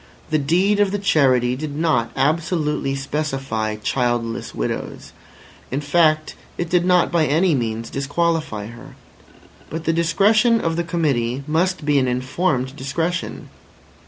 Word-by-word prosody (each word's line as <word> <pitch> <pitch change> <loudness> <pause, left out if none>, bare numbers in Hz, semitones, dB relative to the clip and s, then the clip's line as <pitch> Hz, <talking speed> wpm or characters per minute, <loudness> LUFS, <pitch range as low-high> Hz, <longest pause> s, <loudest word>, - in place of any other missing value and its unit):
The 155 - +3
deed 180 +8 +2
of 205 -1 +4
the 205 - -1
Charity 130 -10 +2
did 145 +1 -5
not 150 -7 +1
absolutely 150 -2 0
specify 135 -6 -2
"childless 120 +1 -2
widows." - - -4 0.6
In 135 - -2
fact, 155 +1 +2 0.2
it 175 -1 -3
did 175 -1 +3
not 180 -1 +3
by 165 -3 +2
any 165 +4 +3
means 115 -3 -2
disqualify 145 -5 -1
her. 120 +2 -12 0.7
But 160 +2 -5
the 165 - +1
discretion 210 +8 +3
of 165 -4 -1
the 170 - 0
Committee 140 -7 -1
must 165 +1 0
be 145 -1 +3
an 130 - +1
informed 130 +1 -1
discretion. 165 +5 -3
150 Hz, 135 wpm, -21 LUFS, 130-170 Hz, 0.7 s, of